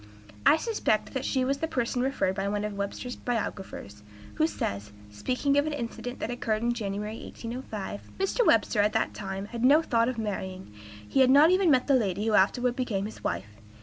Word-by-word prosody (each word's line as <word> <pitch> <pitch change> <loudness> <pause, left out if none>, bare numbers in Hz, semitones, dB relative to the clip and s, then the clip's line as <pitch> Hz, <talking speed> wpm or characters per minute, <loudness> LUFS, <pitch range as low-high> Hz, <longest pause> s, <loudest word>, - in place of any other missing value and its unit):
I - - +7
suspect 365 - 0
that 265 0 -2
she 260 -2 +1
was 275 +1 0
the 320 - -1
person 245 -3 -1
referred 265 -6 +1
to 195 - -3
by 195 - -1
one 205 +1 -1
of 210 - -3
Webster's 200 +5 -4
biographers, 195 - -4 0.3
who 315 0 +2
says, 100 - -4 0.2
speaking 255 - +1
of 290 - 0
an 305 - -2
incident 245 -1 -5
that 230 - -3
occurred 225 -2 -1
in 240 0 +2
January, 210 0 -4
1805: 230 -4 -7
"Mr. 390 +5 +1
Webster, 220 - +3
at 210 +1 +2
that - - 0
time, 195 0 -5
had 235 0 -5
no 290 +5 +6
thought 230 -4 +2
of 255 - -4
marrying; 190 - -4 0.3
he - - 0
had 260 -1 +6
not 290 +5 +7
even 370 -1 +4
met 260 -4 +4
the 280 - +3
lady 205 -5 +1
who 225 - +1
afterward 245 +5 +3
became 220 -7 -1
his 215 - -9
wife. 100 +5 -4
230 Hz, 205 wpm, -28 LUFS, 200-260 Hz, 0.3 s, I